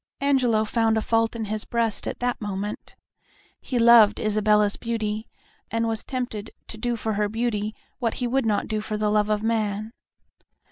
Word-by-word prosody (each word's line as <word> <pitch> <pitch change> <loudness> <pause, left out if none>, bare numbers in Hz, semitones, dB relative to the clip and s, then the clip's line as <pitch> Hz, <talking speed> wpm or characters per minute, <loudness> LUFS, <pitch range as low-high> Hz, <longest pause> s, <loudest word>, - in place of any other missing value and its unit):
Angelo 255 -6 +2
found 225 0 +1
a - - +1
fault 225 0 +1
in 225 -1 -3
his 215 +1 -3
breast 230 -3 -1
at - - -3
that 245 -1 -1
moment. 205 0 -5 0.7
He 255 - -3
loved 230 -3 +7
Isabella's 210 -1 +2
beauty, 220 -1 -3 0.4
and 230 0 0
was 225 -1 -2
tempted 245 -5 -4 0.2
to 220 - -7
do 240 +1 -1
for 220 -1 -2
her 205 0 0
beauty 215 -1 -2 0.2
what 230 -4 -1
he 250 - -2
would 255 0 +1
not 210 -2 +1
do 215 -1 -2
for 215 0 -3
the 210 0 0
love 210 0 +2
of 210 0 0
man. 215 -1 -1
220 Hz, 180 wpm, -24 LUFS, 210-230 Hz, 0.7 s, loved